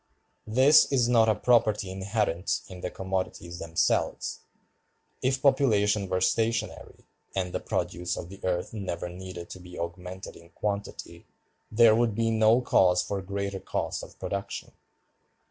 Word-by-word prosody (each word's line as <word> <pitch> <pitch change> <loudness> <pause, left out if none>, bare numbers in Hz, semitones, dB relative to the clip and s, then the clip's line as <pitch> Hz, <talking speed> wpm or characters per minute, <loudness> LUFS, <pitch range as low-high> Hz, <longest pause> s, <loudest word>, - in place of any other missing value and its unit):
This 130 +8 +6
is 125 -4 +3
not 115 -2 +4
a 110 - +3
property 110 -4 +2
inherent 95 -2 -1
in 90 -1 -10
the - - -3
commodities 95 -2 -4
themselves. 85 0 0 0.8
If 130 +1 0
population 105 -8 +3
were 90 0 0
stationary, 115 +4 -1 0.3
and 90 -2 -2
the - - -1
produce 90 +1 -2
of 85 - -6
the 100 +2 -13
earth 90 +2 -1
never 95 -4 -4
needed 90 -1 -8
to 95 - -8
be 90 0 -11
augmented 90 +2 -6
in 85 0 -16
quantity, 100 +1 -5 0.4
there 110 0 +6
would 115 -2 +2
be 115 0 +1
no 110 +2 +4
cause 90 -7 +3
for 100 -1 -3
greater 100 +1 -4
cost - - -3
of - - -12
production. 100 0 -5
100 Hz, 145 wpm, -27 LUFS, 90-110 Hz, 0.8 s, This